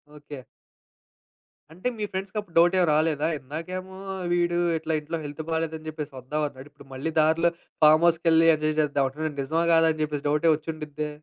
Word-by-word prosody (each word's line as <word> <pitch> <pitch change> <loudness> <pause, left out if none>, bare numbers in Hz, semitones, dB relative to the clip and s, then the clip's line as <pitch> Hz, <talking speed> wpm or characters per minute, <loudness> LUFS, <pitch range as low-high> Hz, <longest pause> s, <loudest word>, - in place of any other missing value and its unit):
Okay. 145 -2 -10 1.3
అంటే 185 +9 -3
మీ 210 - -3
ఫ్రెండ్స్‌కప్పుడు 190 -1 -5
డౌటేమి 175 +1 +4
రాలేదా? 155 -1 +1
ఇందాకేమో 185 +7 -7 0.4
వీడు 175 0 +1 0.2
ఇట్లా 160 0 -3
ఇంట్లో 160 +3 -5
హెల్త్ 145 +2 -6
బాలేదని 160 -1 -3
చెప్పేసి 155 -2 -6
వద్దాం 150 +5 -3
అన్నాడు. 130 0 -13
ఇప్పుడు 145 -1 -17
మళ్ళీ 135 +5 -3
దారిలో 160 +2 +3 0.3
ఫార్మ్‌హౌస్‌కెళ్లి 165 +1 +5
ఎంజాయ్ 155 0 -1
చేద్దాం 145 -2 +1
అంటున్నాడు. 155 +3 -4
ఇది 140 - -5
నిజమా 160 +5 0
కాదా 165 0 +5
అని 155 - -9
చెప్పేసి 150 -1 -3
డౌటే 150 +3 +3
వచ్చిండుద్దే. 155 -1 -5
155 Hz, 155 wpm, -25 LUFS, 150-165 Hz, 1.3 s, ఫార్మ్‌హౌస్‌కెళ్లి